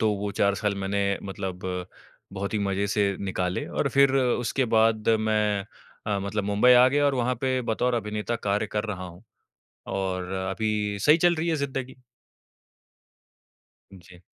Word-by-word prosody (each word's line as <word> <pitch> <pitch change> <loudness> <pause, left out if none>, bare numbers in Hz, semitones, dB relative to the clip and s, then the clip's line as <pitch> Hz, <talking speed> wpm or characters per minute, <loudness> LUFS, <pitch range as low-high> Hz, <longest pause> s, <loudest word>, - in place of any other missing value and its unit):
तो 110 -2 +3
वो 100 +1 -3
4 100 0 +2
साल 100 0 -1
मैंने 100 0 -1
मतलब 95 -2 -5 0.7
बहुत 100 +2 -4
ही 105 - +1
मज़े 100 0 -1
से 100 -1 +1
निकाले 90 -2 -2
और - - -1
फिर 140 -1 +4
उसके 125 0 +1
बाद 110 -1 +3
मैं 105 -2 +1 0.4
अ, 105 -1 0
मतलब 100 +1 -3
मुंबई 105 +5 +4
आ 125 +1 +7
गया 145 +2 +1
और 140 - +2
वहाँ 125 0 0
पे 130 -1 0
बतौर 120 +2 0
अभिनेता 105 +1 -2
कार्य 105 0 -1
कर 105 +1 -1
रहा 95 -4 -5
हूँ 90 +3 -13 0.7
और 95 -1 -3 0.2
अभी 105 0 -1
सही 150 +8 +6
चल 175 0 +4
रही 165 +1 -2
है 160 - +1
ज़िंदगी। 135 -2 -4 2.0
जी। 90 0 -17
105 Hz, 160 wpm, -26 LUFS, 100-125 Hz, 2.0 s, आ